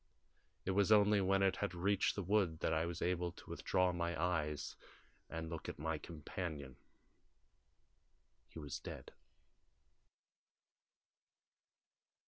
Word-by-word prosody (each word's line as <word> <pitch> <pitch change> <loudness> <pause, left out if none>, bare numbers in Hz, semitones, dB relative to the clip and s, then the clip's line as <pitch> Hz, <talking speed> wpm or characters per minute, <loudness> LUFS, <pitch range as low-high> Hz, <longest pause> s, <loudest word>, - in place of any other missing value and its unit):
It 95 - +1
was 100 +2 +3
only 105 -1 +6
when 95 +1 +3
it 95 -1 +3
had 100 -3 -2
reached 100 +3 +2
the 100 - -2
wood 95 -4 +2
that 80 - +1
I 80 +1 +1
was 85 - -3
able 90 0 0
to - - -14
withdraw 90 -1 +2
my 85 -2 -2
eyes 75 -4 -1 0.5
and 80 0 -4
look 80 -1 -5
at - - -6
my 80 +1 -2
companion. 75 -4 -5 1.7
He - - -13
was 75 -4 -5
dead." - - -8
85 Hz, 120 wpm, -38 LUFS, 80-95 Hz, 1.7 s, only